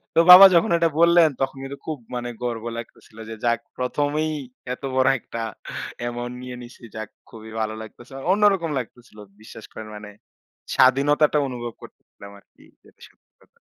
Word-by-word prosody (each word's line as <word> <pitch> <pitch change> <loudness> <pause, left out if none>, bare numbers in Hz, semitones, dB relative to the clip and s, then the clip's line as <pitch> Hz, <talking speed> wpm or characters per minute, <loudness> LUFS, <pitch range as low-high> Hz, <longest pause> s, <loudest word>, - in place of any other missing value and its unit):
তো - - +5
বাবা 185 +2 +12
যখন 170 - +3
এটা 165 -1 +2
বললেন, 170 -1 +6
তখন 135 0 -2
কিন্তু 135 +1 -7
খুব 155 -2 -4 0.2
মানে 120 0 -4
গর্ব 115 -2 -3
লাগতেছিল 115 -1 -11
যে, 115 - -6
যাক 115 -1 +2 0.2
প্রথমেই 145 +4 -1 0.4
এত 125 - -11
বড় 130 0 +4
একটা 115 - -7 0.6
অ্যামাউন্ট 120 0 -5
নিয়ে 125 0 -7
নিছি। 120 0 -13
যাক 110 -1 -6 0.2
খুবই 110 -1 -12
ভালো 110 0 -2
লাগতেছে 115 +3 -13
মানে 135 - -8
অন্যরকম 195 -4 +3
লাগতেছিল। 120 -2 -11 0.2
বিশ্বাস 110 0 -12
করেন 110 - -9
মানে 105 0 -9 0.7
স্বাধীনতাটা 145 +4 +4
অনুভব 120 -2 -6
করতেছিলাম 100 - -15
আরকি - - -25 0.2
যেটা - - -24
সত্যি - - -35
কথা। - - -28
125 Hz, 160 wpm, -23 LUFS, 115-150 Hz, 0.7 s, বাবা